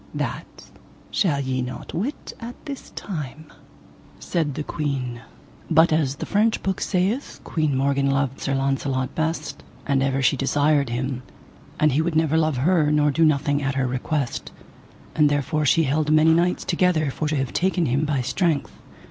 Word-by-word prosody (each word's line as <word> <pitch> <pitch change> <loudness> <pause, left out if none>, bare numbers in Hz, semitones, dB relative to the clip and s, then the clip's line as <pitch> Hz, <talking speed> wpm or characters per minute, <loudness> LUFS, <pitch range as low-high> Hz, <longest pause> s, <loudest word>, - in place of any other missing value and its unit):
That - - -5 0.4
shall 155 -8 +1
ye 130 -2 -1
not 125 +1 -6
wit 230 - -4
as 230 - -6
at 245 - -14
this 280 -3 -7
time, 155 -5 -6 0.7
said 155 -5 -1
the 150 - -3
queen. 130 -6 -3 0.5
But 160 0 +5
as 145 -4 +1
the - - -5
French 215 +2 +1
book 190 -1 -1
saith, 195 +9 -1
Queen 155 -4 0
Morgan 140 0 +1
loved 135 -1 0
Sir 135 - -1
Launcelot 135 -1 -1
best, 160 -1 -2 0.2
and 140 -2 +1
ever 135 0 0
she 130 - +4
desired 145 +1 +2
him, 125 +2 -2 0.6
and 155 -1 +4
he 145 +4 +2
would 165 0 -1
never 160 -1 +2
love 155 -4 +2
her 155 +2 +3
nor 150 -1 +3
do 165 +4 +2
nothing 145 -1 +2
at 140 -1 -1
her 135 -1 +1
request, 130 +1 -2 0.6
and 150 -2 +4
therefore 145 +1 0
she 165 - +4
held 150 +2 0
many 155 +1 +5
knights 175 +2 +1
together 170 -5 +2
for 155 - -3
to 155 - 0
have 135 -3 -2
taken 180 -2 +1
him 135 +3 +1
by 145 -3 0
strength. 145 +1 0
150 Hz, 175 wpm, -23 LUFS, 135-160 Hz, 0.7 s, But